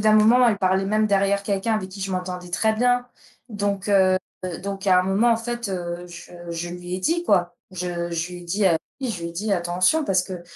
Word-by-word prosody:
d'un 215 +1 +4
moment, 225 +4 +6
elle 210 -3 +1
parlait 190 0 +2
même 215 +2 +2
derrière 200 0 +2
quelqu'un 200 +2 0
avec 190 -3 -2
qui 195 +1 -9
je 190 0 -3
m'entendais 180 -1 -4
très 220 +5 +2
bien, 245 +1 +2 0.4
donc 205 -2 -2
heu, 190 -2 +4 0.5
donc 195 0 -5
à 185 -1 +6
un - - -1
moment, 200 +6 +3
en - - +2
fait, 240 0 -4
heu, 175 -1 -4
je 175 0 -11 0.2
je 170 +1 -4
lui 180 0 -6
ai - - -6
dit, 340 - 0
quoi. 175 - +2 0.2
Je 175 -1 -3
je 170 +2 -2
lui 180 - -7
ai - - -12
dit 195 +4 0 0.4
je 230 -9 -3
lui 170 - -4
ai - - -12
dit: 205 +5 -2
«Attention, 180 - +2
parce 185 -7 +2
que 180 -2 -7
195 Hz, 225 wpm, -23 LUFS, 180-215 Hz, 0.5 s, moment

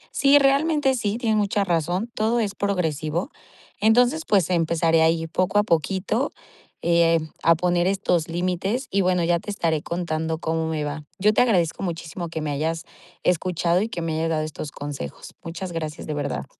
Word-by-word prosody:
Sí, 280 +1 +6
realmente 280 0 +3
sí. 215 -2 -1
Tienes 220 -3 +1
mucha 205 0 +1
razón. 175 +4 -1
Todo 225 +2 +1
es 205 -3 -1
progresivo. 170 - -1 0.5
Entonces, 245 +8 +3
pues, 190 -5 +2
empezaré 165 -1 +2
a 165 0 +2
poco 185 +4 +1
a - - +4
poquito, 195 - 0 0.5
eh, 170 -1 +3 0.2
a 165 0 +6
poner 175 +1 +1
estos 180 -4 +1
límites 185 +8 -1
y 200 - +1
bueno, 180 -2 +2
ya 170 0 +2
te 205 - -6
estaré 165 -6 0
contando 160 -2 -2
cómo 160 0 -1
me 155 -2 -2
va. 145 +1 -5
Yo 210 +2 +4
te - - +4
agradezco 190 -9 +1
muchísimo 170 0 -4
que 160 -1 -4
me 150 -1 -2
hayas 160 +4 -2 0.4
escuchado 180 0 +1
y 220 - -2
que 175 - -4
me 165 -1 -2
hayas 160 +1 0
dado 155 -1 0
estos 155 -1 -6
consejos. 145 - -7
Muchas 170 +2 -6
gracias, 160 -2 -5
de 155 - -2
verdad. 140 - -3
175 Hz, 175 wpm, -23 LUFS, 160-205 Hz, 0.5 s, Sí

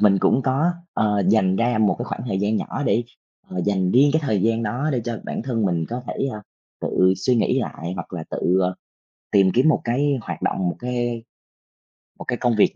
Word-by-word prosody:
mình 100 -2 +5
cũng 135 - +3
có, 140 +6 +2 0.2
ờ, 105 -2 +2
dành 95 -3 +3
ra 115 -1 +1
một 105 -2 +3
cái 120 - -3
khoảng - - -5
thời 95 -5 -1
gian 105 +2 +1
nhỏ 145 - -3
để, 115 +4 +2 0.4
ờ, 90 - -5
dành 95 -2 +1
riêng 140 +4 +6
cái 160 - +2
thời 105 -9 0
gian 115 +1 +1
đó 125 +8 -1
để 125 - 0
cho 115 -2 -3
bản - - -4
thân 115 -4 -1
mình 85 -4 0
có 125 +2 -4
thể, - - -2
ơ, 105 - -6 0.4
tự 95 0 +3
suy 125 +7 +1
nghĩ 130 +3 +2
lại, 85 -5 -5
hoặc 90 0 -7
là 80 -3 -5
tự, 90 +2 +1
ơ, 90 0 +1 0.6
tìm 95 -2 +5
kiếm 130 +6 +4
một - - +2
cái 140 +4 +1
hoạt - - -6
động, - - 0
một - - -4
cái 120 -2 -2 1.0
một - - -6
cái 120 - -1
công 120 -3 +1
việc - - +4
115 Hz, 225 wpm, -22 LUFS, 95-125 Hz, 1.0 s, riêng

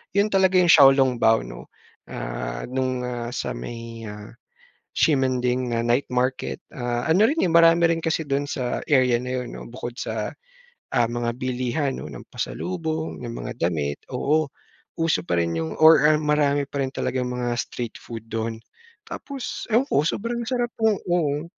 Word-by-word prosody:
yun 200 +1 +4
talaga 190 -1 +3
yung 175 -2 +5
小 140 -3 +9
笼 130 -3 +2
包 110 0 +4
ano, - - -10 0.4
ah, - - -5
nung 130 -1 -1
ah, 120 -1 -4
sa - - -2
may 115 - -7
ah, 105 +1 -9 0.7
Ximanding 130 -4 +2
na 115 - 0
night 120 +4 +1
market 125 - -1 0.2
ah, 120 +3 -2
ano 190 +7 +5
rin 310 +6 +1
eh, 175 - +2
marami 165 0 +6
rin 165 - +2
kasi 160 0 +1
dun 140 +1 0
sa 130 -3 -2
area 130 -4 +4
na 125 +1 -3
'yun 125 - -7
no - - -8
bukod 120 0 -7
sa - - -3 0.6
ah, 120 -1 +2
mga 120 0 -2
bilihan 130 +2 -1
'no 75 - -7
ng - - -10
pasalubong, 160 -6 -4
ng 120 - -5
mga 125 +1 -5 0.2
damit, 70 -4 -3
oo. 155 0 +1 0.5
Uso 165 - +1
pa 85 0 -1
rin 85 0 0
yung 80 -1 -3
or 160 0 +7
ah, 155 - +4
marami 145 -2 +1
pa 140 -1 -3
rin 130 - -2
talagang 125 -1 -2
mga 125 -1 -2
street 120 0 -4
food 115 -1 -9
dun. 115 0 -3 0.5
Tapos 275 -3 -6
ewan 235 +5 +4
ko 145 - +3
sobrang 235 +6 -2
sarap 245 -2 0
nung 220 -3 +3
oo. 155 -4 0
130 Hz, 175 wpm, -24 LUFS, 115-160 Hz, 0.7 s, 小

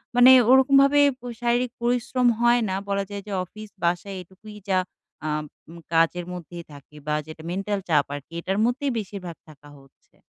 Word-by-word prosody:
মানে 245 +1 +8 0.2
ওরকমভাবে 275 +2 +5 0.2
প - - -72 0.2
শারীরিক 240 +1 +1
পরিশ্রম 245 +1 +1
হয় 240 0 +4
না। 190 - -1
বলা 200 0 0
যায় 200 -1 -6
যে 205 - -7
অফিস 215 +4 -11
বাসায় 175 +3 -1
এটুকুই 190 +4 -14
যা 185 -1 +3 0.5
আ - - -1 0.4
উম 170 - -11 0.2
কাজের 165 +2 +2
মধ্যেই 175 -1 -8
থাকি। 145 +1 -15
বা 150 - 0
যেটা 160 0 -10
মেন্টাল 195 +2 -2
চাপ 150 -3 +3
আরকি, 145 +3 -11
এটার 190 +3 -2
মধ্যেই 270 +3 0
বেশিরভাগ 185 -4 -7
থাকা 145 -1 -16
হচ্ছে। 135 -1 -24
200 Hz, 170 wpm, -24 LUFS, 170-240 Hz, 0.5 s, মানে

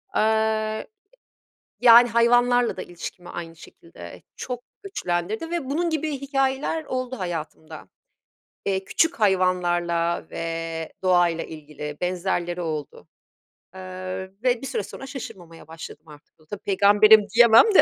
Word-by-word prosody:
Eee, - - +3 1.6
yani, 240 0 +8
hayvanlarla 245 +1 +3
da 185 - -5
ilişkimi 175 +1 -9
aynı 165 -1 -7
şekilde 90 - -13
çok 245 -1 -5 0.2
güçlendirdi 220 - -3
ve 340 -5 -2
bunun 335 +4 0
gibi 315 -1 -1
hikâyeler 275 +3 -1
oldu 255 -2 -4
hayatımda. 165 -3 -6 0.8
Eee, 195 -1 0
küçük 325 - +1
hayvanlarla 175 -3 +1
ve 165 -1 -4
doğayla 175 -3 +2
ilgili 150 -1 -8
benzerleri 180 -1 -2
oldu, 155 -3 -6 0.7
eee, 185 0 -6 0.2
ve 245 -2 +2
bir 270 - -5
süre 455 - -2
sonra 270 - -9
şaşırmamaya 180 - -10
başladım 160 0 -10
artık. 150 +1 -17
E, - - -23
tabii 205 - -7
peygamberim 205 +2 +6
diyemem 235 - +7
de. - - +9
185 Hz, 120 wpm, -24 LUFS, 170-245 Hz, 1.6 s, de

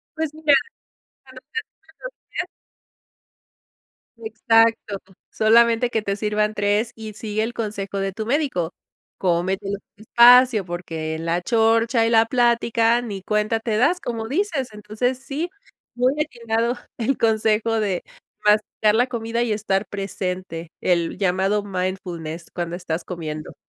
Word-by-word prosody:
Pues 315 -2 -2
mira, 310 -2 +2 0.7
cuando 260 -1 -14
sean 455 -1 -2 0.4
esos - - -7 0.2
días. - - -2 1.7
Exacto, 225 -2 +2 0.3
solamente 230 +2 +4
que 225 -2 0
te 200 -1 -2
sirvan 210 0 0
tres 210 +3 0
y 220 -1 -8
sigue 215 +1 -2
el 235 - -3
consejo 200 -3 -4
de 195 0 -2
tu 220 +2 -4
médico, 240 - 0 0.4
cómetelo 190 +3 0 0.2
despacio, 240 0 +6
porque 165 -2 -4
en 160 +1 -6
la 170 +1 0
chorcha 225 +3 +3
y 230 - +2
la 225 -1 +5
plática 235 -1 +2
ni 205 -5 -6
cuenta 215 +2 0
te 220 -1 -2
das, 345 +11 +3
como 225 -2 -4
dices, 305 -5 -1
entonces 215 +5 -2
sí, 295 +6 -4 0.5
muy 250 +2 +2
atinado 235 -3 -1 0.2
el 240 +3 0
consejo 220 0 +2
de 190 -4 -1 0.4
masticar 210 0 +3
la 245 +3 +3
comida 235 0 -2
y 235 - -1
estar 205 -1 0
presente, 185 -4 -5
el 170 -2 0
llamado 195 +2 +1
mindfulness 180 -4 -4
cuando 175 -1 -3
estás 170 -2 -4
comiendo. 155 -4 -6
220 Hz, 135 wpm, -22 LUFS, 195-235 Hz, 1.7 s, despacio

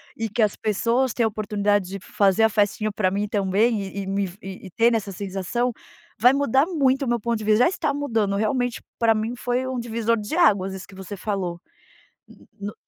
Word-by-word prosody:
e 225 -1 -3
que 225 +3 -1
as 210 - +1
pessoas 230 +4 0
têm 235 - +1
a - - +4
oportunidade 205 -2 0
de 195 0 -5
fazer 200 +1 +2
a 220 - +5
festinha 210 0 +1
pra 195 -3 +1
mim 205 +2 -1
também 205 +2 +1
e 195 +1 -6
e - - -8
me, 195 -1 -1
e 190 0 -9
ter 230 +4 +3
nessa 215 -3 -1
sensação, 195 +6 -2 0.5
vai 250 +3 +7
mudar 280 +2 +2
muito 275 -5 +1
o - - -4
meu 240 0 +1
ponto 230 +1 -1
de 215 - -6
vista, 215 +3 +4
já - - +4
está 320 -5 -1
mudando. 225 -9 0
Realmente, 245 +3 0 0.2
pra 225 -1 +4
mim 220 +2 -2
foi 245 +1 -1
um 260 -1 -3
divisor 230 0 0
de 210 +9 -4
águas 200 - +3
isso 190 - -9
que 195 - -15
você 190 +1 -8
falou, 180 -4 -3 0.7
hum - - -18
no 205 +1 -5
215 Hz, 215 wpm, -23 LUFS, 200-240 Hz, 0.7 s, vai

